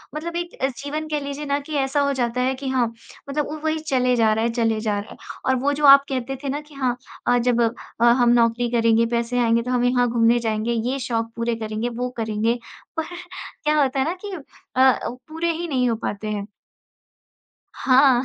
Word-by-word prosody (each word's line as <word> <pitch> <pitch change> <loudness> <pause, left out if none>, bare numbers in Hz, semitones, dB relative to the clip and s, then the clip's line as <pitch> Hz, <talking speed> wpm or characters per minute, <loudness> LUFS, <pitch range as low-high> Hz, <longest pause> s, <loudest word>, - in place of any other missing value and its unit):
मतलब 335 +2 -4
एक 345 0 -3
अ, - - +5
जीवन 285 +4 -5
कह 300 -1 0
लीजिए 285 +1 -5
ना 280 0 0
कि 290 +2 -9
ऐसा 270 +1 +1
हो 280 0 +2
जाता 250 -1 -1
है 260 +1 +1
कि 270 +1 -6
हाँ, 255 -2 +2 0.4
मतलब 295 +1 -1
उ 310 - -5
वही 315 0 0
चले 255 -5 +1
जा 225 -2 +3
रहा 220 +1 0
है 235 - +2
चले 225 -2 +1
जा 210 -2 0
रहा 205 - -9
है। - - -11 0.3
और 260 - +3
वो 285 +2 +2
जो 295 +1 0
आप 275 0 +9
कहते 265 0 -2
थे 280 - -2
ना 290 +2 -2
कि 300 0 -19
हाँ 260 -3 0 0.3
अ, 245 - +4
जब 240 0 +2
अ, 230 0 -2
हम 240 0 +5
नौकरी 235 0 +2
करेंगे, 230 -1 +3
पैसे 235 +1 -1
आएँगे 230 -1 +3
तो 250 +2 -4
हम 245 -1 +1
यहाँ 245 0 +3
घूमने 230 0 +3
जाएँगे। 220 0 -1 0.2
ये 275 +1 -2
शौक 230 -3 -2
पूरे 235 0 -1
करेंगे, 220 +1 -3
वो 245 +1 -3
करेंगे, 220 +1 0 0.4
पर 320 - -1 0.6
क्या 300 0 +3
होता 270 -1 +1
है 265 - +2
ना 330 - -1
कि 405 - -5 0.4
अ 255 - +3
अ, 260 -1 +4 0.2
पूरे 325 +2 -1
ही 335 +1 -4
नहीं 255 -4 +1
हो 230 - +1
पाते 210 +1 -4
हैं। 205 -1 -3 1.3
हाँ। 260 -1 +4
250 Hz, 225 wpm, -22 LUFS, 230-280 Hz, 1.3 s, आप